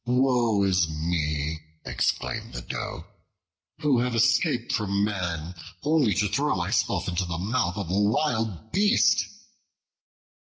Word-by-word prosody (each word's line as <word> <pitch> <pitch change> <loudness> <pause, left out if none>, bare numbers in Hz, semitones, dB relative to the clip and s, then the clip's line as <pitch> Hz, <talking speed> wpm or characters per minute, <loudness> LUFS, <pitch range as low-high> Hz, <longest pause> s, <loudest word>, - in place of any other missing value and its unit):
"Woe 125 -4 +2
is 90 -4 +2
me," 75 -1 -2 0.3
exclaimed 60 -1 -2
the - - -5
Doe, - - -5 0.8
"who 145 -5 +3
have 125 0 0
escaped 115 - +2
from 100 -1 0
man, 90 -5 -2 0.3
only 150 -8 +2
to 105 +1 +2
throw 140 +5 0
myself 95 0 0
into 90 +1 -1
the 85 -1 -4
mouth 95 -1 -1
of 95 -4 -4
a 95 - +2
wild 110 - 0
beast?" 205 +4 +3
100 Hz, 125 wpm, -26 LUFS, 85-120 Hz, 0.8 s, who